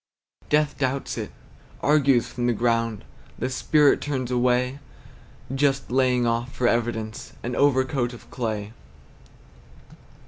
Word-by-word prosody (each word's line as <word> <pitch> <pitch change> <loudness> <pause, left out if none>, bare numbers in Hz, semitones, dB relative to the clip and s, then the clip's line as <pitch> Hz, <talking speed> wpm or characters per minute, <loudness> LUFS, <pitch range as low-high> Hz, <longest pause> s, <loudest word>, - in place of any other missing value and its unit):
Death 150 -1 +2
doubts 135 0 -1
it, - - -5 0.5
argues 140 -5 +4
from 120 -1 -2
the 120 - +3
ground. 115 -2 0 0.3
The 130 +2 -2
Spirit 145 +2 +3
turns 130 -4 -3
away, 125 +2 +1 0.7
Just 135 -1 +1
laying 125 -1 +2
off, 120 +2 -1
for 125 - 0
evidence, 115 -2 -2
An 125 0 -3
overcoat 130 -3 +2
of 120 - -12
clay. 110 -3 -3
125 Hz, 115 wpm, -24 LUFS, 120-135 Hz, 0.7 s, argues